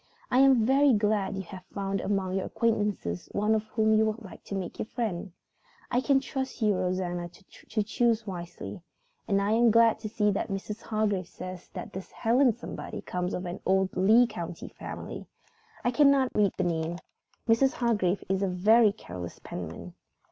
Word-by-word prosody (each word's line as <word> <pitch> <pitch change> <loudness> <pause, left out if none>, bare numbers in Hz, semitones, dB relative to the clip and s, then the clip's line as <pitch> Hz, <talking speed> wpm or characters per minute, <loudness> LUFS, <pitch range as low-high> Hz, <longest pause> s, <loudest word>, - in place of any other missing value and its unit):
I 250 - +4
am 265 -4 +6
very 275 +2 +5
glad 205 -2 +1
you 190 - -4
have 185 +1 -10
found 195 -1 -1
among 195 -2 -1
your 190 0 -1
acquaintances 210 - -1
one 210 +2 +2 0.2
whom 220 -1 +3
you 220 0 +4
would 220 +1 -3
like 190 -5 -11
to 200 - -5
make 185 -3 -5
your - - -2
friend. 210 -7 -3 0.6
I 245 +1 +2
can 275 0 +3
trust 265 0 -4
you, 215 -3 +3
Rosanna, 180 -1 -2
to 205 +4 -5
choose 230 +1 +1
wisely. 175 0 -7 0.5
And 200 -3 +2
I 200 +1 0
am 230 +1 +5
glad 230 0 +5
to 215 -1 -5
see 210 -1 +2
that 195 - -1
Mrs. 205 +2 -4
Hargrave 210 -5 -1
says 185 0 -8
that - - -6
this 190 0 -7
Helen 245 +3 +3
somebody 235 - -7
comes 180 0 -3
of 180 - -4
an 175 +1 -5
old 190 0 +1
Lee 220 +7 +6
County 175 -7 -6
family. - - -8 0.6
I 245 - +2
cannot 275 -1 +4
read 205 -2 +3
the 185 - +1
name. 165 -1 -1 0.5
Mrs. 265 +5 +4
Hargrave 210 - +1
is 190 0 0
a 195 - +2
very 210 +5 +5
careless 90 - -8
penman. - - -7
205 Hz, 175 wpm, -28 LUFS, 185-230 Hz, 0.6 s, am